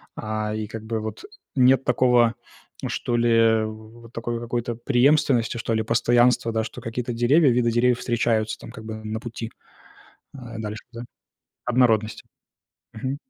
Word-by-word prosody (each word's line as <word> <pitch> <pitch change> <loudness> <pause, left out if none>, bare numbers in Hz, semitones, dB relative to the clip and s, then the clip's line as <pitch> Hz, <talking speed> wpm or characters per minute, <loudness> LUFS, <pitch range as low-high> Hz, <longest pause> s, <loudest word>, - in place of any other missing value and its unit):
А, 110 0 -3
и 110 -1 -3
как 110 +1 -8
бы 110 0 -2
вот 110 - -6 0.3
нет 130 0 +5
такого 125 -2 +3 0.5
что 120 -1 -2
ли, 120 0 +2 0.4
в 110 +2 -10
в 115 - -20
такой 120 0 -4
какой-то 120 0 -3
преемственности, 125 -1 +2
что 115 0 -2
ли, 110 - +1
постоянства, 120 +1 +3
да, 110 0 0
что 110 - -8
какие-то 120 +2 -4
деревья, 130 +6 +4
виды 120 -1 +2
деревьев 125 +1 +2
встречаются, 115 -3 0
там, - - -11
как 110 0 -11
бы 110 - -5
на 110 +1 -4
пути, 115 0 -7 0.8
э, - - -10 0.2
дальше, 105 0 -5
да. 115 - -7 0.6
Однородность. 115 -3 +2 0.7
Мгм. 130 +5 -4
115 Hz, 155 wpm, -24 LUFS, 110-125 Hz, 0.8 s, нет